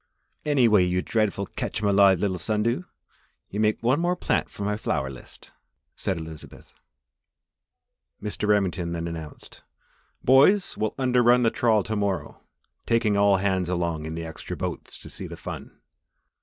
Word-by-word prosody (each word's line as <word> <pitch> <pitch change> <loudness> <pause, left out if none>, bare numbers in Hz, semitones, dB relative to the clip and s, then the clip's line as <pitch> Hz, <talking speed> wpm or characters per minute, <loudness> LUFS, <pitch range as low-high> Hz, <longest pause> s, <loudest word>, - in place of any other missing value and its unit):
"Anyway, 120 -10 +4
you 90 0 0
dreadful 105 -3 0
catch - - -4
'em 105 - 0
alive 100 -1 +5
little 95 -2 -1
sun 105 +4 0
dew, 120 +10 -1 0.7
you 105 - -3
make 110 +1 +1
one 130 +5 +3
more 175 +1 +1
plant - - -1
for 100 - -7
my 105 +1 0
flower 65 -10 -2
list," 65 - -13 0.4
said 95 - -2
Elizabeth. 80 -2 -10 1.5
Mr. 105 0 -3
Remington 90 -5 +1
then 85 0 -3
announced: 80 -3 -9 0.6
"Boys, 145 +10 +5
we'll 110 0 -2
under 125 -2 +2
run 120 +1 +5
the 115 - +3
trawl 110 -4 +2
to 110 - -3
morrow, 100 -3 -2 0.5
taking 115 -3 +2
all 100 -1 +4
hands 95 -2 0
along 85 -3 -1
in 80 0 -5
the 85 0 -5
extra 80 -1 -7
boats - - -5
to - - -8
see - - -5
the - - -9
fun. - - -8
100 Hz, 160 wpm, -25 LUFS, 90-115 Hz, 1.5 s, alive